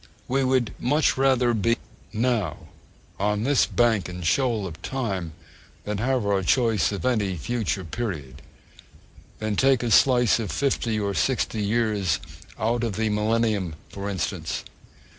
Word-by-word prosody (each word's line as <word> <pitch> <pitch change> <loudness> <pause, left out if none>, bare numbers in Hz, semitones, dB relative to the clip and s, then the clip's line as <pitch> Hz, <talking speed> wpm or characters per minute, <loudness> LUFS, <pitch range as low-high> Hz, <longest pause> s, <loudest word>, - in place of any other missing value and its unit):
We 135 +2 +1
would 130 -3 +1
much 150 +5 +2
rather 130 -3 +3
be 115 +2 +1 0.3
now, 110 - -1 0.5
'on 105 +1 0
this 140 +1 +3
bank 115 -6 +2
and 90 -1 -6
shoal 115 +1 +1
of 85 -2 -8
time,' 95 -11 -3 0.5
than 105 -1 -3
have 125 -1 0
our 100 -1 +2
choice 115 +3 +2
of 100 +4 -4
any 105 -7 +1
future 110 +1 -2
period, 80 - -5 1.0
than 110 -1 -2
take 130 +1 +3
a 120 - -1
slice 125 -1 +5
of 105 -7 -3
fifty 115 - 0
or 100 -1 -1
sixty 115 0 0
years 105 -4 +1 0.4
out 115 +2 0
of 115 -4 -1
the 110 0 0
Millennium, 105 -4 0
for 100 0 -5
instance. 90 -3 -3
110 Hz, 140 wpm, -25 LUFS, 100-120 Hz, 1.0 s, slice